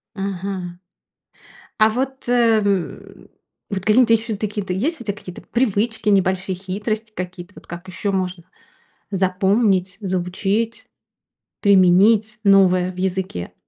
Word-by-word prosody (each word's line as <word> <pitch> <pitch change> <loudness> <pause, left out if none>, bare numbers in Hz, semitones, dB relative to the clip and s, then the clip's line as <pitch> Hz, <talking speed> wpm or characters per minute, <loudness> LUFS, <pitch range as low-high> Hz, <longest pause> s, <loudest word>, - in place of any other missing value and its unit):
Ага. 190 -2 -4 1.0
А 215 0 +6
вот, 265 +2 -4
э, 235 -3 +4
м, 195 -4 -3 0.4
вот 195 -2 -2
какие 215 +4 +5
н 250 - +5
то 230 - +3
ещё 220 -1 +1
такие-то 205 -2 -3
есть 265 - -1
у - - -8
тя 200 - -1
какие-то 185 -3 -10
привычки, 225 -2 -1
небольшие 190 -1 +1
хитрости 210 +4 -4
какие-то? 180 0 -7
Вот, - - -15
как 175 +2 -8
еще 195 +2 -3
можно 185 -2 -2 0.7
запомнить, 190 0 +1
заучить, 195 +4 -2 0.8
применить 200 +3 +4
новое 185 -2 +4
в 185 - -15
языке? 185 - -3
195 Hz, 125 wpm, -21 LUFS, 185-215 Hz, 1.0 s, А